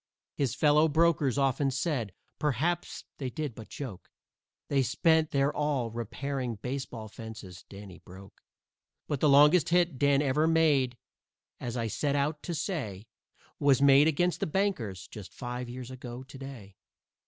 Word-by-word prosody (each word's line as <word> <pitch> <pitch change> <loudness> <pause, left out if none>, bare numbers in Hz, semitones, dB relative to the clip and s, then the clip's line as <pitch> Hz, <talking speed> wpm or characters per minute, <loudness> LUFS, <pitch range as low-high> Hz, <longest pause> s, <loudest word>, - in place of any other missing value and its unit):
His 135 -6 -1
fellow 150 +1 +4
brokers 155 -4 +2
often 135 0 +2
said 135 - -2 0.3
perhaps 155 +5 -1 0.2
they 135 -3 -3
did 145 +1 -4
but 110 0 -11
joke 120 -11 -8 0.6
They 140 -1 +2
spent 160 +5 +2
their 140 +1 +1
all 140 -6 -1
repairing 125 +2 -4
baseball 125 -1 -5
fences 110 -4 -10
Danny 100 -2 -11
broke. 95 +2 -14 0.7
But 145 - -2
the 150 - +3
longest 150 +5 +6
hit 175 -5 +2
Dan 140 0 +3
ever 150 +3 +2
made, 145 -7 +3 0.6
as 120 0 -4
I 115 - -1
set 140 +6 -1
out 145 +2 0
to 170 - -4
say, 140 - -4 0.5
Was 140 -2 +4
made 140 +1 +6
against 175 +3 +1
the - - -1
Bankers 135 - -2
just 95 -5 -11
five 125 -1 -5
years 125 +1 -7
ago 125 -1 -8
to 135 +1 -12
day. 120 -8 -10
135 Hz, 150 wpm, -29 LUFS, 120-150 Hz, 0.7 s, longest